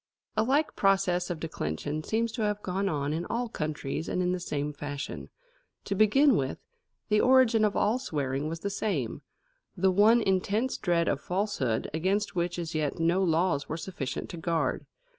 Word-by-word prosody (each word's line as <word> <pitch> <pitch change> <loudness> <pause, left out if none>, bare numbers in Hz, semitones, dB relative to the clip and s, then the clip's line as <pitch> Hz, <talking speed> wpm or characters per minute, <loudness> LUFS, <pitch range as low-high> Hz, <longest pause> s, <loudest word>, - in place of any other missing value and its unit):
A - - +3
like 275 +7 +1
process 190 -2 +2
of 175 -3 -3
declension 150 - -3
seems 225 +6 0
to 230 - -4
have 210 -1 -1
gone 195 +2 -1
on 145 -2 -1
in 165 +2 -2
all 240 +2 -1
countries 155 -4 -4
and - - -1
in 180 0 +1
the 185 - -1
same 150 -4 -3
fashion. 145 -1 -6 0.6
To 200 - -1
begin 230 +7 +5
with, 130 - -1 0.5
the 210 0 +4
origin 250 -4 +5
of 210 -1 +2
all 225 +5 +2
swearing 145 - -2
was 165 0 -5
the 200 - -2
same 205 +1 -2 0.6
the 190 +1 +3
one 215 +5 +5
intense 210 +4 +1
dread 170 -3 +1
of 140 - 0
falsehood 180 - -1
against 190 +6 0
which 175 0 -1
as 170 -1 -4
yet 155 -3 -1
no 170 +3 +2
laws 165 -4 +1
were 160 - -2
sufficient 165 -6 -5
to 175 - -7
guard. 165 0 -1
180 Hz, 180 wpm, -28 LUFS, 155-210 Hz, 0.6 s, begin